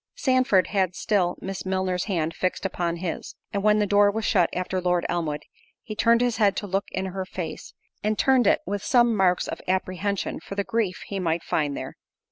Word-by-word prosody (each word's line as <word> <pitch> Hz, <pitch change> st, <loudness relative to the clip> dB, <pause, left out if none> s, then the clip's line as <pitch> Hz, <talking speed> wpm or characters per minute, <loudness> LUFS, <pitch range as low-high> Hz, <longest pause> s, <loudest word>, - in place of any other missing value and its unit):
Sandford 255 Hz, -, +3 dB
had 190 Hz, -3 st, +1 dB
still 185 Hz, -5 st, +1 dB
Miss 195 Hz, 0 st, -5 dB
Milner's 185 Hz, -1 st, -1 dB
hand 165 Hz, -6 st, -1 dB
fixed 185 Hz, +1 st, -2 dB
upon 175 Hz, -2 st, -1 dB
his; 170 Hz, -1 st, -5 dB, 0.2 s
and 200 Hz, -, 0 dB
when 210 Hz, +1 st, +4 dB
the 210 Hz, -, +2 dB
door 205 Hz, 0 st, +5 dB
was 220 Hz, +1 st, -2 dB
shut 180 Hz, -4 st, +3 dB
after 185 Hz, +1 st, -2 dB
Lord 180 Hz, -1 st, +1 dB
Elmwood, 155 Hz, -4 st, -2 dB, 0.4 s
he 220 Hz, -, -6 dB
turned 230 Hz, +2 st, +4 dB
his 245 Hz, -2 st, +1 dB
head 205 Hz, -2 st, +3 dB
to -, -, -3 dB
look 195 Hz, 0 st, -1 dB
in 190 Hz, -, -2 dB
her 190 Hz, 0 st, -3 dB
face, 180 Hz, -3 st, -7 dB, 0.3 s
and 215 Hz, 0 st, 0 dB
turned 260 Hz, -5 st, +4 dB
it -, -, +4 dB
with 200 Hz, +1 st, -3 dB
some 240 Hz, -2 st, +4 dB
marks 185 Hz, -3 st, +2 dB
of -, -, -5 dB
apprehension 190 Hz, +1 st, -1 dB
for 195 Hz, -, -8 dB
the 200 Hz, -, 0 dB
grief 210 Hz, -4 st, -1 dB
he 200 Hz, -, -4 dB
might 165 Hz, -2 st, 0 dB
find 145 Hz, -2 st, -1 dB
there. -, -, -6 dB
190 Hz, 205 wpm, -25 LUFS, 180-210 Hz, 0.4 s, door